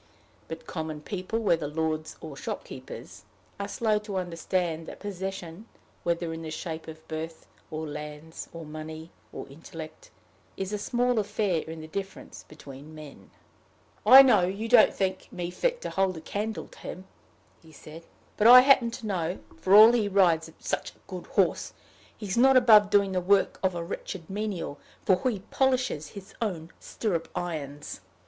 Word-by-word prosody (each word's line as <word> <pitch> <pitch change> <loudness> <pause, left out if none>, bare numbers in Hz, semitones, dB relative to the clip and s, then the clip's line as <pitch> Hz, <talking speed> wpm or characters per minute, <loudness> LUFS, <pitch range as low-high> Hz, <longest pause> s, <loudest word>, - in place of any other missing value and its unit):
But 160 - -8
common 155 -2 -5
people, 190 +5 -4
whether 170 -9 +1
lords 155 +1 -2
or 155 -3 -8
shopkeepers, - - -8 0.4
are 200 - -3
slow 215 0 +1
to 210 -2 -5
understand 170 -2 -2
that - - -9
possession, 190 -1 -6 0.3
whether 170 -1 -1
in 165 - -6
the 160 - -6
shape 160 0 -6
of 160 0 -11
birth, 160 +1 -6 0.2
or 155 0 -4
lands, 150 +2 -8
or 165 -1 -8
money, 155 +1 -8 0.2
or - - -7
intellect, 160 - -10 0.5
is 195 +1 -4
a 210 - -1
small 245 +2 +1
affair 205 -5 0
in 160 0 -7
the 155 - -9
difference 195 +4 -7
between 145 0 -12
men. 145 -11 -12 0.7
"I 260 +6 +11
know 210 -9 +4
you 200 +4 -3
don't 230 -1 +7
think 190 -1 -3
me 175 -1 -4
fit - - -1
to - - -5
hold 190 -2 +1
a - - -8
candle 215 +5 -4
to - - -16
him," 185 - -8 0.6
he 160 - -17
said. 155 +2 -12 0.3
"But 215 - +5
I 250 +1 +11
happen 260 -3 +5
to 235 0 -8
know, 180 -3 -1 0.2
for 190 +1 +4
all 215 +2 +10
he 230 -4 +1
rides 170 -5 +3
such - - -3
a - - -27
good - - -8
horse, - - +1 0.4
he's 200 -4 -4
not 265 +2 +6
above 215 -5 +7
doing 200 -1 +3
the 185 -1 0
work 195 +2 +2
of 185 -2 +1
a 170 - -3
wretched 170 0 -6
menial, 195 -8 -4 0.3
for 195 +7 +3
he 210 -6 -4
polishes 255 - +1
his 195 0 -10
own 170 -7 -3
stirrup 180 -8 -3
irons." 150 - -5
180 Hz, 170 wpm, -27 LUFS, 160-210 Hz, 0.7 s, I